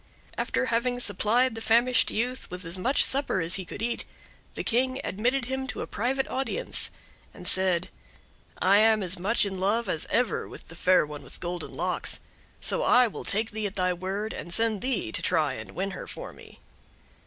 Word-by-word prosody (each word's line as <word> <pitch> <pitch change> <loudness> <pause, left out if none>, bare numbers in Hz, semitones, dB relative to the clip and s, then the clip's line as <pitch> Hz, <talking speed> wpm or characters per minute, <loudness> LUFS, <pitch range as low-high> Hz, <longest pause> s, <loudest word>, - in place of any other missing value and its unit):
After - - 0
having 245 +1 0
supplied 230 +3 +2
the 225 - -7
famished 235 +2 +3
youth 250 +3 -2
with 180 0 -7
as 165 +2 0
much 245 +10 +3
supper 275 -7 +3
as 165 0 +1
he 190 -1 0
could 205 - -7
eat, 235 0 -1 0.5
the - - -3
King 260 +3 +1
admitted 240 +6 0
him 265 +1 -3
to - - -4
a - - -4
private 260 +5 -1
audience, 270 - -1 0.5
and - - -7
said: 185 -2 +4 0.7
"I 195 +2 +5
am 220 -1 +4
as 185 0 +1
much 205 +5 +2
in 190 -2 -4
love 210 +4 +1
as 165 -4 0
ever 245 -1 +1
with - - -12
the 165 - -10
Fair 180 -1 +4
One 150 -1 -8
with - - -13
Golden 175 0 -5
Locks, - - -2 0.4
so - - 0
I 250 - +5
will 225 - -5
take 220 +2 -1
thee 215 -1 -2
at 195 - -9
thy 180 -1 +1
word, 195 +4 -4
and 170 - -7
send 225 0 +1
thee 245 - -1
to - - 0
try 155 -6 +1
and - - -9
win 195 +2 -2
her - - -7
for - - -7
me." - - -15
215 Hz, 200 wpm, -27 LUFS, 185-245 Hz, 0.7 s, I